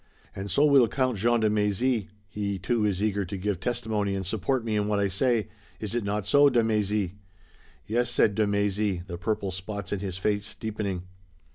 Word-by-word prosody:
"And 95 +1 -5
so 145 - +4
will 140 -5 +6
Count 130 -3 0
Jean 120 +2 +3
de 110 - +3
Mézy. 105 +2 +1 0.2
He 100 0 -3
too 105 +5 0
is 100 -1 0
eager 100 -2 +1
to 95 +2 -5
give 95 -1 -2
testimony 110 -2 -1
and 95 -1 -3
support 115 +6 -1
me 110 -2 -1
in 105 -1 +1
what 105 -1 +1
I 100 - +2
say. 115 +3 +1 0.3
Is 105 -1 -3
it 120 -2 0
not 100 0 -2
so, 145 +6 +6
de 120 -3 +3
Mézy?" 105 -3 0 0.7
"Yes," 120 +2 0
said 110 -3 +3
de 110 0 +1
Mézy, 100 -2 0
the 85 -2 -7
purple 100 0 -1
spots 100 +2 -5
in 100 - -1
his 95 -2 -4
face 100 +2 -1
deepening. 105 -5 -3
105 Hz, 200 wpm, -27 LUFS, 100-115 Hz, 0.7 s, will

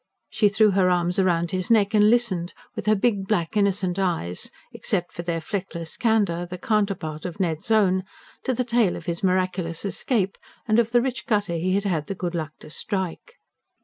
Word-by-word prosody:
She 210 - +3
threw 215 +1 +4
her 190 -1 +3
arms 180 +1 +2
round 170 -2 +1
his 185 -1 -1
neck, 215 -3 +4
and 210 0 +6
listened, 215 -8 +1 0.2
with - - -5
her 215 - +5
big, 200 -2 0
black, 185 -4 0
innocent 195 -2 +1
eyes 165 - -1 0.2
except 175 0 -2
for 170 - -5
their 170 -1 -2
fleckless 170 -2 -5
candour, 200 -7 +1
the 180 +1 -6
counterpart 195 -7 -1
of 180 0 -6
Ned's 165 0 -1
own 190 -4 +3 0.4
to 260 - +1
the 250 - 0
tale 230 -6 +2
of - - -8
his 170 -1 -2
miraculous 185 -2 0
escape, 200 -1 -1 0.3
and 215 +1 +4
of 230 -1 +2
the 240 0 +4
rich 260 0 -3
gutter 205 -6 +1
he 180 +3 0
had 200 - +1
had 165 -7 -1
the 195 - -3
good 175 -2 -3
luck 155 -3 -3
to - - -11
strike. 190 - -4
190 Hz, 195 wpm, -24 LUFS, 175-215 Hz, 0.4 s, and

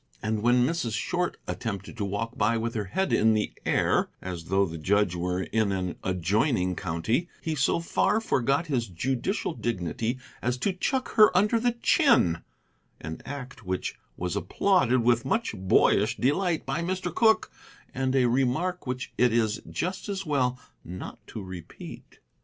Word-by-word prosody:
And, 110 0 -1
when 120 +2 +4
Mrs. 130 -7 -1
Short 180 +8 -1
attempted 100 -3 -5
to 105 - -1
walk 115 +5 -3
by 110 +2 +2
with 115 +1 -2
her 105 -3 -2
head 190 - -1
in 110 0 +4
the 105 - -1
air, - - +2
as 90 -3 -6
though 95 +3 +2
the 85 -2 -6
judge 100 +2 +2
were 90 +1 -1
in 110 -1 0
an 95 -2 -2
adjoining 90 - +1
county, 110 - -1
he 160 -3 -3
so 140 +3 +2
far 205 +5 +1
forgot 140 - +1
his 130 -7 -1
judicial 130 - -2
dignity 115 - -2 0.2
as 125 +1 0
to 190 +10 0
chuck 260 +8 -1
her 215 -1 +9
under 210 +4 +3
the 240 +1 +1
chin, 235 - +3 0.6
an 80 +1 -7
act 130 -4 -7
which 95 -1 -2 0.2
was 90 +2 -2
applauded 130 - +2
with 120 0 +3
much 225 - 0
boyish 100 +3 +3
delight 165 +5 +1
by 170 - -1
Mr. 185 +2 -2
Cooke, 220 -1 +3 0.4
and 130 0 0
a 130 -2 +4
remark 135 +8 0
which 125 0 -4
it 125 -1 +5
is 110 -2 +1
just 185 +3 -3
as 195 -1 -3
well 130 -5 +1 0.3
not 90 +2 -8
to 110 - -7
repeat. 90 -2 -10
120 Hz, 165 wpm, -27 LUFS, 100-165 Hz, 0.6 s, her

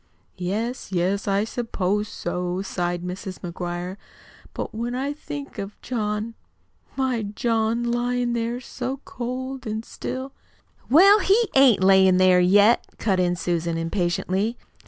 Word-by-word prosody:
"Yes, 215 +7 -3
yes, 190 +3 0
I 200 +1 +2
s'pose 210 -3 -1
so," 180 +1 -3
sighed 175 -2 -2
Mrs. 185 +1 -6
McGuire. 175 +1 -5 0.5
"But - - -5
when 235 +3 -3
I 275 +3 -2
think 290 -1 -8
of 200 +1 -6
John, 215 -2 -2 0.6
my 260 -3 0
John, 225 +2 0
lyin' 240 0 0
there 235 +1 -1
so 255 +1 -5
cold 255 +1 -5
an' 220 +1 -3
still 260 +3 -6 0.3
" - - -34
"Well, 390 - +7
he 425 +3 +3
ain't 260 -8 +5
lyin' 190 -1 +6
there 185 -1 +5
yet," 205 +6 +5
cut 195 -4 +1
in 180 -1 +2
Susan 170 -1 -1
impatiently. 185 +5 -1
210 Hz, 135 wpm, -24 LUFS, 185-245 Hz, 0.6 s, Well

